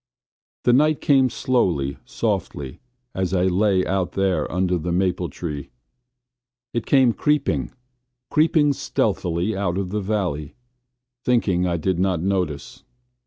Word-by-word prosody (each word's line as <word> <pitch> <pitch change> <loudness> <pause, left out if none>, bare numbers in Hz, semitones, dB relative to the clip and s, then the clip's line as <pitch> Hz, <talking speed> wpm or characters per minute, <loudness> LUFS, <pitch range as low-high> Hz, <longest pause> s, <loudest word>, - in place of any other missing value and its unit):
The 120 - +4
night 150 +3 +3
came 135 -3 +4
slowly, 90 - 0
softly, 65 -3 -3 0.3
as 95 0 -1
I 90 - +2
lay 95 0 +2
out 95 -1 -1
there 95 -1 0
under 90 0 0
the 85 +2 -3
maple 90 -1 0
tree. 75 -5 -6 1.0
It 120 - -2
came 130 -4 +4
creeping, 150 +2 0 0.6
creeping 155 -2 +3
stealthily 90 -5 -1
out 95 -2 -1
of 95 -2 -2
the 105 0 -1
valley, 90 -8 -2 0.7
thinking 95 -8 +2
I 85 -1 0
did 90 +2 -1
not 95 -2 +1
notice. 90 -5 -2
95 Hz, 125 wpm, -22 LUFS, 90-115 Hz, 1.0 s, The